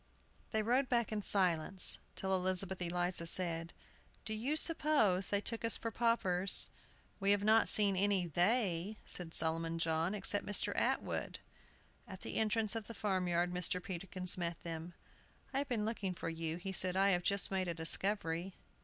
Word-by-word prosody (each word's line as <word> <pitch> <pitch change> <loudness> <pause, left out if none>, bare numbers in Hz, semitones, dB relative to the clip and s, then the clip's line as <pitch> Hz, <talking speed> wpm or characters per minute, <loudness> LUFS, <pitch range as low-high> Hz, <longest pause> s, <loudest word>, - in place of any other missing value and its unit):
They 220 -1 -1
rode 250 +4 +1
back 235 -2 +1
in 215 -1 -2
silence, 185 -2 +2 0.2
till 190 0 -2
Elizabeth 185 0 -1
Eliza 175 0 -1
said, 165 -2 +2 0.5
"Do 220 - -3
you 245 +8 -2
suppose 290 - +3
they 200 0 0
took 230 +2 -4
us 230 - +2
for 230 - -5
paupers?" 200 -5 +1 0.5
"We 195 0 +1
have 205 0 +3
not 220 +1 +4
seen 200 -2 +4
any 195 -1 +1
'they,'" 185 - 0
said 170 -2 -1
Solomon 165 +1 0
John, 165 +3 0
"except 205 0 +3
Mr. 205 - -1
Atwood." - - -1 0.7
At 190 -3 -10
the - - -4
entrance 220 0 +1
of 225 -2 -5
the 230 - -9
farm 190 -4 -1
yard 175 +1 0
Mr. 180 0 0
Peterkin 185 +1 -7
met 170 -2 -3
them. 165 +1 -7 0.6
"I 270 - +1
have 285 - -3
been 220 -4 -1
looking 200 -5 -3
for 165 - -5
you," 165 0 -4
he 190 +2 -6
said. 185 0 +1
"I 195 +1 +4
have 175 -1 +2
just 200 +2 +2
made 190 -1 -1
a 170 - -3
discovery." 175 +1 -1
190 Hz, 170 wpm, -35 LUFS, 175-215 Hz, 0.7 s, not